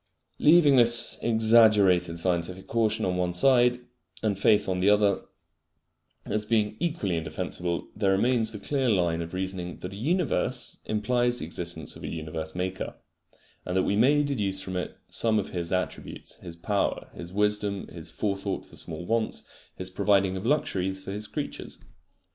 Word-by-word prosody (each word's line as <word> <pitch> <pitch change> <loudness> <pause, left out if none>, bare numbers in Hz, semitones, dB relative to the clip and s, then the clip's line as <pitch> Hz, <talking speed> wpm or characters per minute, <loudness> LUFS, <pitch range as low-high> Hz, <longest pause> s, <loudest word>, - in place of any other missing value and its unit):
Leaving 150 -3 +6
this 120 -1 +4
exaggerated 110 -7 +4
scientific 90 +2 -1
caution 110 -1 0
on 90 - 0
the 90 - -2
one 90 -1 0
side, 125 +5 +3 0.4
and 100 -3 0
faith 105 0 +4
on 95 -1 -1
the 95 +2 +3
other, 105 -2 +3 1.0
as 105 +1 -1
being 105 -1 +1
equally 155 - -1
indefensible, 85 +2 -3
there 100 -2 +1
remains 110 +3 +2
the 110 - -5
clear 135 +4 -1
line 85 -5 +1
of 85 +2 -6
reasoning 95 -2 -3
that 90 +1 -7
a - - -7
universe 130 - -1
implies 120 +3 0
the - - -4
existence 85 -2 -4
of - - -12
a - - -4
universe 80 0 -5
maker, 95 +1 -3 0.7
and 90 +1 -2
that 95 - +3
we 100 - +1
may 140 +7 +4
deduce 105 -9 -1
from 95 -1 -5
it 90 - -4
some 110 -2 +2
of 100 - -1
His 85 -2 -4
attributes, 90 0 -4
His 85 - -9
power, 100 +4 -1
His 85 0 -8
wisdom, 105 0 0
His 85 -1 -8
forethought 100 +2 -3
for - - -13
small 80 +1 -6
wants, 115 +2 -1 0.3
His - - -4
providing 95 -2 +2
of 95 +4 -4
luxuries 95 -10 0
for 95 - -6
His 105 +1 -2
creatures. 145 +6 -6
100 Hz, 165 wpm, -27 LUFS, 90-115 Hz, 1.0 s, Leaving